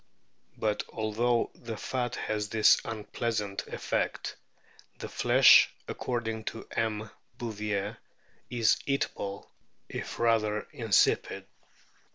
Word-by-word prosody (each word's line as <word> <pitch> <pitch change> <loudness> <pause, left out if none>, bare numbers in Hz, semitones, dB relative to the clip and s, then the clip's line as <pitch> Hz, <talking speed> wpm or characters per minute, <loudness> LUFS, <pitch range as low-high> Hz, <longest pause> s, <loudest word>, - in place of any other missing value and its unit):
But 105 -1 0
although 115 +2 0
the 115 -2 -7
fat 125 0 -2
has 105 -1 -2
this 110 0 +5
unpleasant 105 -2 -3
effect, - - -2 0.6
the - - -6
flesh, - - +6 0.2
according 115 -3 -3
to 115 - -6
M. 110 -1 -2 0.3
Bouvier, 105 -3 -3 0.5
is 115 -3 +3
eatable 100 -7 -2 0.4
if - - -6
rather 110 -2 +2
in 120 -6 -5
sipid. 95 - +3
110 Hz, 100 wpm, -29 LUFS, 105-115 Hz, 0.6 s, flesh